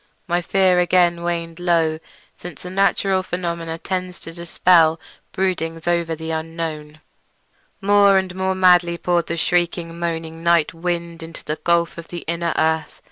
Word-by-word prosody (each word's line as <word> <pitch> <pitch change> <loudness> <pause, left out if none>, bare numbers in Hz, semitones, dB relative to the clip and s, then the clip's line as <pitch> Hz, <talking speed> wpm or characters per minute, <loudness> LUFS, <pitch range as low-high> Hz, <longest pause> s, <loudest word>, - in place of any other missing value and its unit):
My 175 +1 0
fear 185 0 +3
again 175 -1 +3
waned 170 -1 -3
low, 165 -3 +1 0.4
since 175 -2 -11
a 180 - -6
natural 195 0 +2
phenomenon 170 -3 -4
tends 185 -1 -4
to 165 - -10
dispel 170 -1 +3 0.3
broodings 165 -3 -2
over 170 -1 0
the 160 +1 -6
unknown. 160 -1 -5 0.8
More 200 0 +5
and 190 -1 -1
more 190 0 -1
madly 180 -2 +4
poured 175 -1 0
the 170 - -3
shrieking, 170 0 -1
moaning 165 -1 -4
night 170 -2 +2
wind 170 0 -4
into 165 0 -9
that 155 - -5
gulf 170 -1 +1
of 165 - -10
the 175 - -8
inner 170 0 -1
earth. 160 -1 0
170 Hz, 150 wpm, -21 LUFS, 165-180 Hz, 0.8 s, More